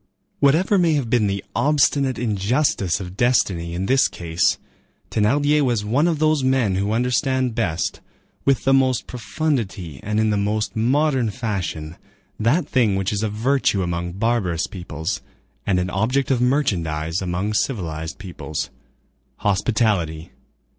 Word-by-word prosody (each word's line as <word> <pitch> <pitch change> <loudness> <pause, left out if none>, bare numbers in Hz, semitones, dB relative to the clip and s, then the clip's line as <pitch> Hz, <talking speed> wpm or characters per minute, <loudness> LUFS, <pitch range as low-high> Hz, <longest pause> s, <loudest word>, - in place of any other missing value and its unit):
Whatever 170 +8 +3
may 170 -3 +3
have 135 -7 -1
been 115 -4 +3
the 100 0 -2
obstinate 140 -2 +2
injustice 105 - 0
of 90 -1 -7
destiny 95 -8 +1
in 95 +2 -2
this 135 +5 +4
case, 85 0 0 0.5
Thénardier 145 +8 +2
was 120 -6 0
one 135 +10 +2
of 165 -3 +1
those 155 -2 +2
men 130 -6 +2
who 100 +2 0
understand 125 +2 +1
best, 90 -8 -1 0.4
with 135 -2 +2
the 135 - +3
most 130 -2 +2
profundity 115 - -3
and 105 +1 -1
in 110 0 +2
the 105 - +1
most 105 +2 -1
modern 130 +1 +2
fashion, 95 -8 -4 0.4
that 125 +11 +2
thing 115 -7 +2
which 95 +1 -1
is 105 - -1
a 110 - 0
virtue 110 -2 +1
among 85 0 -3
barbarous 100 -5 0
peoples 85 0 -5 0.5
and 95 - +2
an 90 0 -2
object 125 +9 0
of 125 -2 +2
merchandise 85 - 0
among 95 +3 -2
civilized 80 - -2
peoples,—hospitality. 95 +1 -3
110 Hz, 140 wpm, -22 LUFS, 90-130 Hz, 0.5 s, this